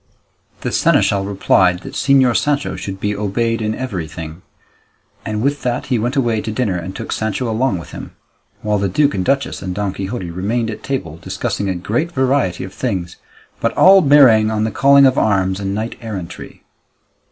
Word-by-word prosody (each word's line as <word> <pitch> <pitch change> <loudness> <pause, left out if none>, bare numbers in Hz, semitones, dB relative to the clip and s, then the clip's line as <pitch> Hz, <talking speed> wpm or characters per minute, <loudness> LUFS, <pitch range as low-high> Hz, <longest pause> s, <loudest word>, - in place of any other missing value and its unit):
The - - -3
seneschal 100 -1 +2
replied 95 -2 +2
that - - -9
Señor 130 -3 +3
Sancho 145 -1 0
should 95 -1 -6
be 105 +1 -1
obeyed 115 +3 -1
in 110 0 -1
everything; 80 -8 -6 0.8
and 110 0 -3
with 145 +1 0
that 125 0 -2
he 120 - +2
went 120 +4 -2
away 120 -5 +1
to 110 - -4
dinner 110 -4 -1
and 90 +2 -5
took - - -6
Sancho 110 +3 -2
along 115 -2 0
with 85 - -10
him, - - -9 0.5
while 105 -1 0
the 100 0 0
duke 145 +10 +2
and 95 - -1
duchess 135 +6 -1
and 90 -1 -4
Don 100 -1 -2
Quixote 95 -2 -5
remained 110 +6 -2
at 105 - -8
table 95 - -4
discussing 100 +3 -3
a 95 - -1
great 115 - -2
variety 130 - 0
of 95 +1 -8
things, 90 -4 -3 0.4
but - - -1
all 195 +1 +7
bearing 135 -8 +6
on 110 -1 -1
the 110 - -1
calling 140 0 +5
of 130 0 +3
arms 95 -2 +1
and 100 0 -3
knight 110 +2 -3
errantry. 100 -7 -8
110 Hz, 185 wpm, -18 LUFS, 95-125 Hz, 0.8 s, all